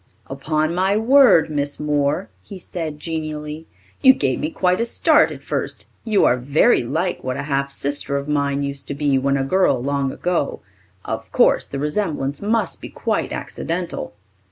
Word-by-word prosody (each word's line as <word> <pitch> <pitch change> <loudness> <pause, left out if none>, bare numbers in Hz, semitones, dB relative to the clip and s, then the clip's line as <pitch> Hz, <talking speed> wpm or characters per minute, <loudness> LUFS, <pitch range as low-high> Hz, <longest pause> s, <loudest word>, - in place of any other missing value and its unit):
"Upon 155 +4 -1
my 190 +3 +1
word, 245 - +5
Miss 145 -1 -2
Moore," 145 -6 0
he 195 - -10
said 165 -4 -6
genially, 155 -1 -5 0.3
"you 265 -1 +8
gave 130 - 0
me 155 - -2
quite 180 +4 +1
a - - +1
start 235 - +3
at - - -9
first. - - -3 0.2
You 215 -3 +2
are 125 - +3
very 140 - +3
like 165 +9 -2
what 130 0 -3
a - - -3
half 140 -1 -1
sister 140 0 -1
of 140 +1 -5
mine 140 -1 0
used 140 0 -4
to 140 - -4
be 140 -2 +1
when 140 +1 +1
a 135 - 0
girl 180 -2 +2
long 140 +1 -1
ago. 175 -3 -2 0.4
Of - - -5
course - - +3
the 140 - -5
resemblance 150 -2 -2
must 215 -2 -1
be - - -8
quite - - -2
accidental." 170 -10 -4
150 Hz, 175 wpm, -21 LUFS, 140-180 Hz, 0.4 s, you